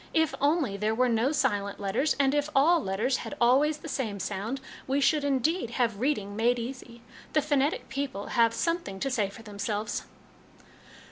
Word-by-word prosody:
If 320 -2 +3
only 285 - +2
there 215 +2 0
were 250 +1 +3
no 235 +4 +2
silent 205 -9 0
letters, 205 +9 0
and 275 -1 +3
if 290 +1 +1
all 325 +6 +5
letters 220 +7 0
had - - -6
always 275 +6 +4
the 310 - -10
same 230 -9 -3
sound, 210 +8 -3 0.3
we 270 +2 +1
should, 295 +1 +3
indeed, 285 +1 +1
have 230 -5 +1
reading 215 -7 -1
made 235 +3 +2
easy. 240 -1 -7 0.3
The 305 - +4
phonetic 290 +1 +1
people 270 -7 -4
have 230 -1 +4
some 335 +1 +1
thing 195 - -8
to 270 - -1
say 215 -6 +1
for 225 +3 -12
themselves." 210 0 -3
255 Hz, 180 wpm, -28 LUFS, 210-285 Hz, 0.3 s, all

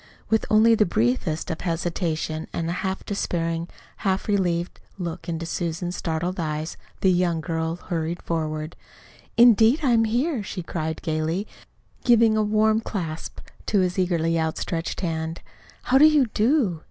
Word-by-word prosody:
With 220 - +2
only 220 +2 +6
the 220 - +4
briefest 140 +5 0
of 160 - -5
hesitations 165 -2 -2
and 165 - -2
a 170 - -1
half 190 0 -3
despairing, 165 -4 -2 0.3
half 190 -2 -1
relieved 180 -4 0 0.2
look 175 -2 -5
into 165 0 -3
Susan's 175 +1 -3
startled 170 +3 -2
eyes, 155 0 -3 0.3
the 190 - +4
young 175 -2 +1
girl 160 0 -2
hurried 170 -1 -3
forward. 155 -1 -3 0.6
"Indeed 235 +4 +6
I'm 235 -4 +4
here," 245 +4 0
she 190 -2 -5
cried 160 -1 -4
gayly, 160 +4 -1 0.6
giving 230 -2 +5
a 215 - +2
warm 215 +1 +2
clasp 165 -8 -5 0.3
to 205 -3 +3
his 180 +1 0
eagerly 165 -2 +1
outstretched 165 +2 -2
hand 160 -2 -3 0.4
"How 265 +2 +4
do 300 - +8
you 305 -3 +5
do? 220 - +2
175 Hz, 145 wpm, -24 LUFS, 165-215 Hz, 0.6 s, do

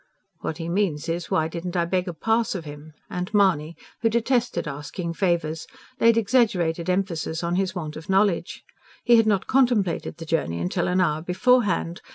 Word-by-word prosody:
("What 160 - -4
he 165 -1 -5
means 170 -4 -1
is, 170 +1 -3
why 155 - +2
I - - -1
didn't 175 +2 -5
beg 185 0 +1
a 175 - -3
pass 225 +3 0
of 170 -4 -5
him.") 150 +1 -10
And 180 +2 -4
Mahony, 170 -6 +2 0.2
who 225 - +3
detested 235 - 0
asking 150 +4 -5
favours, 165 -4 -1 0.3
laid 230 -1 +5
exaggerated 190 -8 +1
emphasis 175 -3 -1
on 170 0 -1
his 190 0 -1
want 155 -4 -5
of 160 +3 -10
knowledge. 195 -2 +1 0.4
He 240 -1 +6
had 225 -1 +4
not 200 -3 +2
contemplated 240 -9 +1
the 165 - -8
journey 85 - -1
till - - -1
an 180 +1 +2
hour 155 -3 +1
beforehand. 185 -1 +1
180 Hz, 180 wpm, -24 LUFS, 165-205 Hz, 0.4 s, He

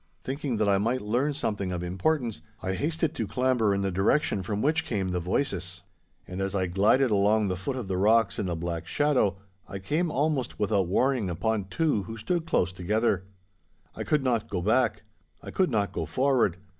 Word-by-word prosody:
Thinking 135 -2 -2
that 105 -1 +1
I 100 -1 +3
might 120 +4 0
learn 120 +8 +1
something 105 -8 -2
of 90 -1 -3
importance, 115 - -1 0.2
I 95 - -2
hasted 160 - -1
to 115 -9 -3
clamber 125 -4 +1
in 100 0 0
the 95 - 0
direction 95 +4 +1
from 100 +2 -3
which 155 +6 +2
came 100 -10 -2
the 90 - 0
voices. 90 -2 -2 0.4
And 90 +1 -5
as 95 +1 -2
I 95 -1 +1
glided 105 +8 +3
along 105 +1 +3
the 95 - -1
foot 95 +9 -4
of 125 -6 -5
the 95 -1 -1
rocks 110 +4 +3
in 95 - -1
the 85 - -1
black 85 0 -4
shadow, 130 -10 +2 0.3
I 100 - -6
came 155 - -1
almost 145 -3 -1
without 100 -3 +1
warning 125 +1 +1
upon 100 +4 -1
two 145 - 0
who 110 +4 -7
stood 165 +10 -2
close 90 - +1
together. 95 +1 0 0.7
I - - -4
could 150 -3 +1
not 115 -3 0
go 90 -4 -2
back. 110 0 +2 0.4
I - - -7
could 185 -2 +2
not 105 -5 0
go - - -3
forward. 130 -9 +2
105 Hz, 195 wpm, -27 LUFS, 95-130 Hz, 0.7 s, I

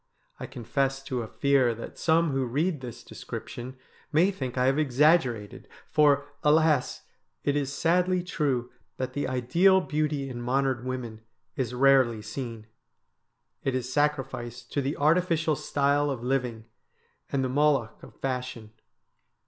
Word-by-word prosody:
I - - -5
confess 135 +3 -2
to 125 -2 -3
a 115 - -5
fear 135 -2 +2
that 115 - -8
some 165 -1 +3
who 135 -1 0
read 150 +4 -1
this 120 -3 -8
description 125 +2 -8 0.3
may 170 +6 +4
think 130 -9 -5
I 125 - +3
have 135 +3 +2
exaggerated, 135 - +2 0.2
for, 145 -2 +3 0.2
alas! 150 -2 +2 0.4
it 145 - +1
is 140 -2 -1
sadly 180 +5 +1
true 135 -8 -1 0.3
that 130 - -3
the 145 - -2
ideal 150 +10 +3
beauty 150 -5 -1
in 120 -2 -6
modern 130 0 0
women 120 -4 -5 0.3
is 125 -4 -2
rarely 130 -4 +4
seen. 115 0 -6 1.0
It 135 - 0
is 130 0 -3
sacrificed 135 -5 -2
to 140 - +1
the 140 +3 -2
artificial 160 0 +2
style 145 +1 +1
of 130 -4 -4
living 125 -4 -1 0.7
and 135 -1 0
the 130 - -1
Moloch 140 -4 +1
of - - -14
fashion. 125 -4 -4
135 Hz, 140 wpm, -27 LUFS, 125-150 Hz, 1.0 s, may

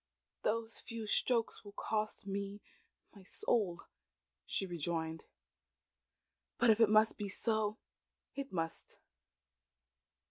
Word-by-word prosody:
"Those 225 +1 0
few 230 -2 -5
strokes 230 +2 +1
will 205 -1 -10
cost 215 -1 -2
me 200 +1 -3 0.5
my 200 - -13
soul," 200 - 0 0.6
she 195 - 0
rejoined. 165 -2 -2 1.3
"But 235 -1 +6
if 220 - +3
it 225 -2 +7
must 215 +1 +5
be 205 -1 -2
so, 215 +1 +1 0.6
it 275 -1 -5
must. 165 -2 -2
210 Hz, 105 wpm, -36 LUFS, 190-225 Hz, 1.3 s, it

